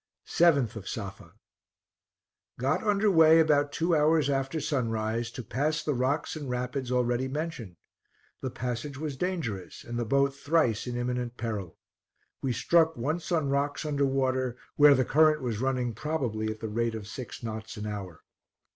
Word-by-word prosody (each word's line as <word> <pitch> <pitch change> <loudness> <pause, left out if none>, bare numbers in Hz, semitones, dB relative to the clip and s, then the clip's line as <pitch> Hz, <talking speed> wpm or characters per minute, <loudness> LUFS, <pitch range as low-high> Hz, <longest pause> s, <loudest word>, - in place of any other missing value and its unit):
7th 140 -10 +3
of 100 -3 -7
Safa. 100 -3 -7 1.2
Got 135 +5 0
under 210 -1 +3
way 160 -2 +7
about 145 -2 +3
two 165 +1 +1
hours 150 -2 +3
after 135 +3 -1
sunrise, 115 -5 -1
to 120 +1 -7
pass 150 +8 -1
the 150 - 0
rocks 135 +6 -1
and 145 -4 -6
rapids 125 +1 -3
already 125 +1 +1
mentioned. 135 - -5 0.7
The 130 - -2
passage 125 +3 -4
was 150 -1 -4
dangerous, 140 - -4
and 120 0 -4
the - - 0
boat 140 +3 +2
thrice 140 -6 +1
in 120 0 -3
imminent 125 0 -2
peril. 105 -7 -4 0.6
We 135 - 0
struck 160 +5 +3
once 155 +9 -2
on 160 -5 +1
rocks 145 +2 -1
under 145 -2 +1
water, 130 -2 0 0.2
where 145 -1 +7
the 130 -1 +2
current 155 +1 +4
was 115 -3 -2
running 130 -3 0
probably 115 -5 -2
at 110 0 -6
the 110 - -3
rate 115 +1 -1
of 110 -2 -6
six 120 +2 -8
knots 110 0 -6
an 105 - -5
hour. 100 -6 -6
130 Hz, 165 wpm, -28 LUFS, 115-150 Hz, 1.2 s, way